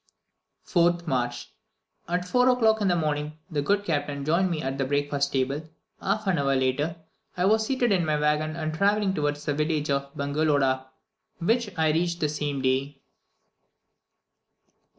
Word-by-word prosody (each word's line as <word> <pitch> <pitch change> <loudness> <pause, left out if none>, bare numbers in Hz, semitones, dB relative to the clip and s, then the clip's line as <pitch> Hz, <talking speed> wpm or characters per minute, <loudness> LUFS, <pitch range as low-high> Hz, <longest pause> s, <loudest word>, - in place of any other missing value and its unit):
4th 175 -1 +2
March. 120 - -2 0.5
At 180 +1 -1
4 250 +6 +3
o'clock 220 -3 +3
in 200 - +2
the 180 - +3
morning, 150 -1 -2
the 150 -2 0
good 205 +7 +1
captain 145 -4 -2
joined 170 +5 +2
me 165 -3 -2
at 135 +1 -3
the - - +2
breakfast 145 +1 0
table; 140 +4 -1 0.3
half 215 +3 -1
an 185 -5 +1
hour 140 -1 +2
later, 130 +5 0 0.4
I 180 - +2
was 220 +2 +3
seated 255 -4 +1
in 185 -3 +3
my 155 -1 0
waggon 150 +1 +1
and 155 -1 -3
travelling 200 +3 +2
towards 145 -2 -2
the 145 - 0
village 150 0 0
of 140 0 -1
Bongeloda, 140 -2 +1 0.5
which 225 +5 +1
I 160 -1 +3
reached 170 +2 0
the 150 - +1
same 145 -2 -3
day. 135 +2 0
155 Hz, 160 wpm, -26 LUFS, 140-180 Hz, 0.5 s, 4